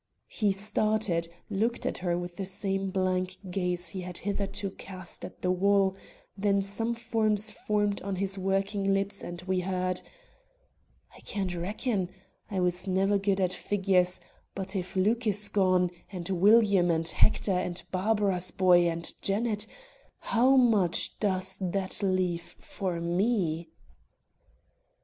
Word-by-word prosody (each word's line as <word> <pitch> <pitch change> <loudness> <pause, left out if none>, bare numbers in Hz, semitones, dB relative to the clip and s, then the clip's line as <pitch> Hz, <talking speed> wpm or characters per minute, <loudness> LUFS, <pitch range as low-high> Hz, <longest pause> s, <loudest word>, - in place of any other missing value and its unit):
He 210 -3 +2
started, 205 -3 0 0.2
looked 225 +4 0
at - - -1
her 175 -1 0
with 175 0 -6
the 195 - -3
same 195 0 -2
blank 185 -1 -1
gaze 180 -2 -1
he 190 - -5
had 180 -1 -5
hitherto 200 0 -3
cast 185 -2 -8
at 180 - -9
the 180 - +2
wall; 195 +1 +3 0.4
then 200 0 +1
some 225 +4 0 0.2
words 215 -1 +3
formed 205 -1 -1
on 195 0 -3
his 195 +1 -1
working 195 +1 0
lips 200 +1 -1
and 175 0 -6
we 185 0 0
heard: 185 0 -1 1.1
"I - - -14
can 200 -3 -3
not 180 -1 -3
reckon; 195 +1 -1 0.4
I 195 - -2
was 180 +1 +1
never 195 +2 +2
good 195 0 +1
at 185 -1 +1
figures; 185 -3 +1 0.4
but 190 0 -5
if 185 -1 -3
Luke 220 +5 +2
is 205 0 +2
gone, 185 -3 +2 0.2
and 175 -3 -5
William, 200 -1 +5
and 165 -1 +1
Hector, 200 +4 +2
and 180 -1 -1
Barbara's 195 -2 +1
boy, 175 -2 +4
and 170 0 -3
Janet, 210 +1 -1 0.5
how 250 +3 +3
much 215 -9 +3
does 190 -2 +1
that 190 +2 -2
leave 185 -3 -1
for 185 -4 -4
me?" 170 -2 0
190 Hz, 140 wpm, -29 LUFS, 180-205 Hz, 1.1 s, William